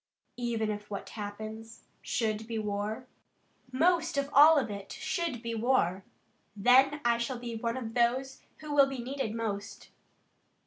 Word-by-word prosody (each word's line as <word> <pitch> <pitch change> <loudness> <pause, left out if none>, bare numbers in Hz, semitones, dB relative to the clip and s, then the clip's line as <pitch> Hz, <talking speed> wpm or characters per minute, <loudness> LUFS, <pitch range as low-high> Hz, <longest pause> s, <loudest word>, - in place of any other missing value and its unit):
"Even 230 -3 -1
if 210 0 -7
what 200 -1 -6
happens 220 +2 -8 0.2
should 220 -1 -2
be 230 -1 -3
war?" 210 +3 -3 0.7
"Most 330 +3 +2
of 280 0 -1
all 300 +3 +8
if 265 -5 +1
it 200 -2 -7
should 330 -10 -3
be 230 0 -3
war. 215 -6 +1 0.5
Then 265 +7 +4
I 235 0 +3
shall 240 +2 -2
be 240 -1 -6
one 230 +2 -2
of 225 -3 -5
those 255 +3 0 0.2
who 305 -1 -5
will 280 -1 +6
be 270 -1 -5
needed 245 -2 -3
most." 210 -2 -5
235 Hz, 150 wpm, -30 LUFS, 215-270 Hz, 0.7 s, all